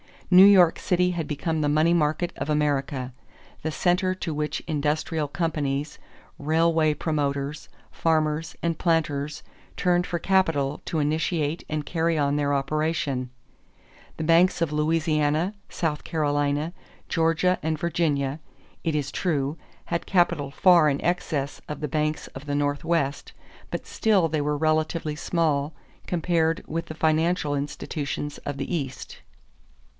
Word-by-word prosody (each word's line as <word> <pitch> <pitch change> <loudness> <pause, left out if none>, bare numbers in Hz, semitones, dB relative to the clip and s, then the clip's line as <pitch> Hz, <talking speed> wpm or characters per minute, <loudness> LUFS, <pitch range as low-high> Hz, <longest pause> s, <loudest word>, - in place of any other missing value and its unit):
New 185 +2 +9
York 185 -4 +6
City 180 -1 +2
had 165 -4 -3
become 160 +2 -2
the 145 - +1
money 155 +3 +3
market 155 +1 +1
of - - -4
America, 140 -3 0 0.5
the 160 - -2
center 180 +4 +1
to 165 -3 -4
which 150 0 -2
industrial 155 0 -1
companies, 150 -2 -2 0.4
railway 160 +1 +2
promoters, 145 -1 -2 0.2
farmers, 155 -1 0
and 165 -1 -1
planters 150 -3 0 0.3
turned 180 0 +1
for 175 - -1
capital 165 -7 +1
to 165 - -2
initiate 155 +1 -1
and 150 -1 -2
carry 165 0 0
on 145 -1 +1
their 145 -1 +1
operations. 140 -2 -1 0.9
The 160 - -3
banks 170 +4 +4
of 165 -3 0
Louisiana, 155 +2 +1 0.2
South 155 -3 -2
Carolina, 145 +1 0 0.3
Georgia, 165 +2 +2
and 160 0 -1
Virginia, 150 -4 0 0.5
it 160 -2 0
is 145 -2 -1
true, 150 -4 -1 0.3
had 170 - -2
capital 170 -6 +2
far 170 +1 +5
in 140 - 0
excess 155 -5 -1
of 150 - -5
the 150 - -2
banks 155 +1 -1
of 135 +2 -10
the 145 -1 -2
Northwest; 145 0 -1 0.4
but - - -4
still 195 -7 +2
they 155 -1 0
were 150 0 0
relatively 155 0 0
small 150 -2 0 0.3
compared 165 -1 +1
with 165 +1 -3
the 155 - -8
financial 160 -1 +1
institutions 145 +1 -4
of 145 -1 -5
the 140 +5 -4
East. 135 -6 -4
155 Hz, 135 wpm, -25 LUFS, 145-165 Hz, 0.9 s, New